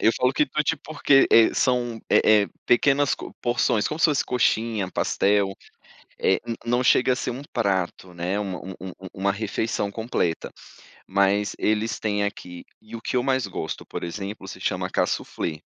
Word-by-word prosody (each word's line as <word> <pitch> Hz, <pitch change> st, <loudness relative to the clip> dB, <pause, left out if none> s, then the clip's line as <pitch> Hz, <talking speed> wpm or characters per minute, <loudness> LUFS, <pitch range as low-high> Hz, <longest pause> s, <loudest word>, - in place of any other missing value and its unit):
Eu 110 Hz, -, +5 dB
falo 125 Hz, +1 st, +2 dB
quitute 150 Hz, +3 st, +1 dB
porque, 145 Hz, -2 st, +3 dB
eh, 115 Hz, -1 st, +6 dB
são, 120 Hz, -3 st, 0 dB
eh 105 Hz, -1 st, +5 dB
eh, 100 Hz, -, -3 dB, 0.2 s
pequenas 140 Hz, +3 st, +3 dB
co -, -, -9 dB
porções, 120 Hz, -3 st, +1 dB
como 155 Hz, -, -4 dB
se -, -, +2 dB
fosse 150 Hz, -3 st, +1 dB
coxinha, 110 Hz, -5 st, 0 dB
pastel, 100 Hz, 0 st, +1 dB, 0.7 s
eh, 95 Hz, -, +2 dB
n 115 Hz, -1 st, -3 dB
não 120 Hz, +1 st, +1 dB
chega 130 Hz, +1 st, +4 dB
a -, -, 0 dB
ser -, -, -3 dB
um 125 Hz, +3 st, -6 dB
prato, 95 Hz, -5 st, -1 dB
né, 90 Hz, +3 st, -2 dB
uma 95 Hz, -3 st, -3 dB
u 95 Hz, -, -8 dB
u 95 Hz, 0 st, -7 dB, 0.2 s
uma 100 Hz, +1 st, 0 dB
refeição 105 Hz, 0 st, -2 dB
completa. 100 Hz, -6 st, -2 dB, 0.6 s
Mas 100 Hz, +2 st, +1 dB
eles 110 Hz, +1 st, 0 dB
têm 105 Hz, -1 st, 0 dB
aqui, 90 Hz, -4 st, -6 dB, 0.2 s
e 110 Hz, +1 st, -10 dB
o 115 Hz, -, -7 dB
que -, -, -3 dB
eu 125 Hz, -, +1 dB
mais 130 Hz, -4 st, +1 dB
gosto, 85 Hz, -4 st, -5 dB
por -, -, -6 dB
exemplo, 95 Hz, +3 st, -6 dB
se -, -, -8 dB
chama -, -, -2 dB
Kaassoufflé. 80 Hz, -2 st, -2 dB
110 Hz, 175 wpm, -24 LUFS, 100-125 Hz, 0.7 s, eh